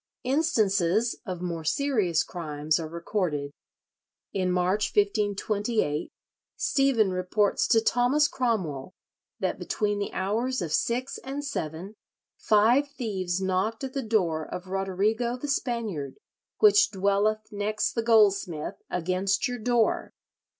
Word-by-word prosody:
Instances 225 - +2
of 180 -1 -4
more 170 -2 -3
serious 205 - +1
crimes 155 -2 -2
are 160 - -4
recorded. 170 -4 -2 0.8
In 185 -2 0
March, 185 +4 +1
1528, 205 -4 0 0.5
Stephen 260 -8 +2
reports 185 +3 +1
to 225 -2 +4
Thomas 245 +6 +3
Cromwell 185 - -2 0.4
that - - -2
between 205 -2 -1
the 200 - -3
hours 230 +7 -1
of 170 -5 -3
six 250 +3 -1
and 280 +2 -5
seven, 180 - -4 0.4
"five 230 +7 +3
thieves 190 -9 -3
knocked 190 +6 -1
at 265 -1 -4
the 275 - -1
door 185 -9 0
of 180 +3 -7
Roderigo 205 +6 0
the 290 - -4
Spaniard, 225 - -2 0.4
which 415 -2 +6
dwelleth 205 +2 0
next 210 +1 -1
the 230 - 0
goldsmith 200 -8 +2
against 185 +3 0
your 245 -1 -4
door. 235 0 +1
205 Hz, 120 wpm, -27 LUFS, 180-235 Hz, 0.8 s, which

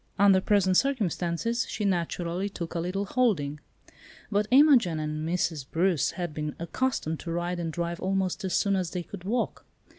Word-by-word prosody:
Under 195 -1 +5
present 190 -2 +3
circumstances, 230 - 0
she 210 - -3
naturally 175 0 -1
took 170 -4 -6
a 170 - -2
little 185 +4 -2
holding. 185 - 0 0.7
But 205 0 +1
Imogen 255 - +5
and 155 +1 -3
Mrs. 170 -4 -1
Bruce 175 -1 +2
had 175 -3 -4
been 150 -1 -4
accustomed 170 -3 -2
to 170 - -6
ride 175 +1 -2
and 165 -1 -2
drive 170 +1 -3
almost 190 +1 -1
as 190 - -1
soon 200 -2 +2
as 185 -3 -1
they 180 0 -4
could 185 0 -10
walk. 235 +4 -1
180 Hz, 170 wpm, -27 LUFS, 170-200 Hz, 0.7 s, Under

